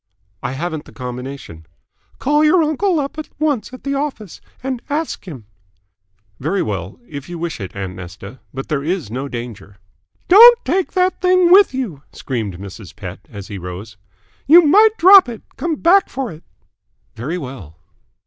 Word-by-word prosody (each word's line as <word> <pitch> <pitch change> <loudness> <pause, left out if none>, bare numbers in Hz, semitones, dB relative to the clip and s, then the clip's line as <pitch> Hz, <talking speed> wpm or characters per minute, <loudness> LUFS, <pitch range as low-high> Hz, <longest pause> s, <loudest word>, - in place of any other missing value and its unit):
"I - - -3
haven't 160 +2 -4
the - - -15
combination." 125 - -8 0.5
"Call 295 +2 +2
your 320 +2 +4
uncle 320 +3 0
up 280 +2 -4
at 310 - -7
once 290 -8 -1
at 255 - -11
the 280 - -2
office 275 - -4 0.2
and 260 -2 -3
ask 295 -7 -3
him." 130 - -9 0.9
"Very 175 +8 -1
well. 95 -3 -5
If 140 +1 -9
you 175 - -6
wish 170 -4 -4
it, 95 - -7
aunt 95 -2 -5
Nesta. 95 +7 -10
But 135 +1 -6
there 150 -4 -2
is 165 - -3
no 130 +4 -4
danger." 115 -6 -8 0.5
"Don't 470 +5 +8
take 360 +6 -1
that 370 0 +1
thing 365 -1 +4
with 390 -7 +6
you," 205 - -4
screamed 110 -9 -4
Mrs. 100 +1 -10
Pett, 95 -3 -8
as 100 -1 -10
he 100 -2 -6
rose. 90 +4 -8 0.5
"You 340 +5 +8
might 430 +8 +5
drop 375 -3 +8
it. 230 -2 -8
Come 335 -2 -2
back 370 +6 +3
for 265 -3 -4
it." 160 +1 -13 0.7
"Very 140 +10 -4
well." 125 - -9
170 Hz, 170 wpm, -18 LUFS, -, 0.9 s, Don't